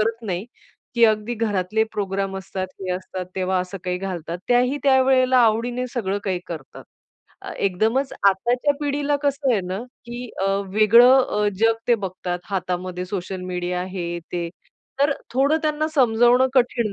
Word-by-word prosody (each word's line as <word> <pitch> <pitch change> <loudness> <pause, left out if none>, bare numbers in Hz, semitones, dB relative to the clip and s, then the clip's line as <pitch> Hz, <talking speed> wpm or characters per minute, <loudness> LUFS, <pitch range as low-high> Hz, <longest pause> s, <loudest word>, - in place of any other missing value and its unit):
करत 225 +2 -1
नाही, 185 +2 -3 0.5
की 235 -1 +5
अगदी 215 +1 +2
घरातले 215 -2 0
प्रोग्राम 195 -1 -2
असतात, 190 0 -5
हे 185 -1 -4
असतात 185 0 -5
तेव्हा 185 0 0
असं 185 +2 -6
काही 180 0 -1
घालतात. 175 -3 -5
त्याही 250 +3 +3
त्यावेळेला 260 -1 +4
आवडीने 240 +2 +2
सगळं 200 -5 -1
काही 185 -2 -1
करतात. 155 -6 -9 0.6
अ, - - -7
एकदमच 220 +8 0 0.2
आताच्या 240 +9 +1
पिढीला 290 0 0
कसं 280 -2 +1
आहे 215 - +2
ना, 185 +2 -3 0.3
की 240 0 -6
अ, - - +2 0.3
वेगळं 235 +5 +7
अ, 210 -3 0
जग 225 0 +4
ते 240 - +6
बघतात. 185 -4 -4
हातामध्ये 180 -1 -3
सोशल 190 0 -4
मीडिया 180 0 -3
हे 175 -2 -3
ते, 175 -1 -2 0.5
तर 280 0 +4 0.2
थोडं 280 +4 +3
त्यांना 310 0 0
समजवणं 245 -1 +4
कठीण 240 -4 +2
215 Hz, 150 wpm, -22 LUFS, 185-250 Hz, 0.6 s, वेगळं